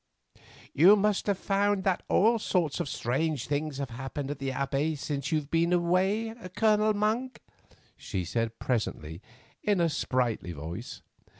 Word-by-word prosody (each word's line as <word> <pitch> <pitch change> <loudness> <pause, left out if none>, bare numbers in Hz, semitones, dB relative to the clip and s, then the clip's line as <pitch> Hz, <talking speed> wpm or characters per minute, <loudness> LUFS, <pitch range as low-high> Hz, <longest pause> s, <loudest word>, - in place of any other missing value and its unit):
"You 180 +8 +7
must 210 0 +1
have 200 -2 +1
found 200 0 +1
that 190 -2 +1
all 230 +3 +4
sorts 175 -8 0
of - - -2
strange 135 +3 -1
things 145 -1 -2
have 140 -3 -4
happened 135 +3 -5
at 145 - -6
the 135 -1 -2
Abbey 140 +4 -1
since 140 0 -4
you 160 - +3
have 150 -1 -5
been 165 +1 +2
away, 190 +6 +1 0.2
Colonel 215 -1 +3
Monk," 225 +5 -1 0.6
she 90 -2 -4
said 115 +5 -2
presently 85 -9 -3 0.4
in 205 -3 +1
a 170 -1 +3
sprightly 120 - -1
voice. 85 - -7
155 Hz, 155 wpm, -28 LUFS, 130-200 Hz, 0.6 s, You